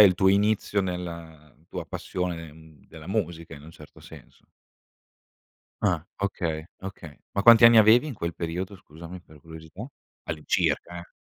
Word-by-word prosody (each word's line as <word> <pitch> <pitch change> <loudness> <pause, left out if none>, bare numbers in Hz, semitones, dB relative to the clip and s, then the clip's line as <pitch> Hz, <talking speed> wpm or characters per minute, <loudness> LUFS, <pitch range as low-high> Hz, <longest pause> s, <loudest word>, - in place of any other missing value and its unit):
il 100 -3 +7
tuo 95 +1 +2
inizio 100 0 +2
nella 85 -4 -6 0.2
tua - - -6
passione, 85 -4 -4
mhmm, 80 -2 -18
della 80 0 -12
musica, 85 -5 -3
in 70 - -13
un 80 - -12
certo 75 -3 -15
senso. - - -15 1.4
Ah, 85 -5 +1
okay, 85 -6 -2 0.2
okay. 90 -6 -9 0.2
Ma 100 - 0
quanti 115 +1 +8
anni 115 0 +9
avevi 110 +6 +6
in 140 - -5
quel 85 -4 -4
periodo, 90 +4 -4
scusami, 85 +1 -11
per 80 -3 -18
curiosità? 80 - -10 0.4
All'incirca, 80 +2 -1
eh. 85 - -15
85 Hz, 150 wpm, -26 LUFS, 80-100 Hz, 1.4 s, anni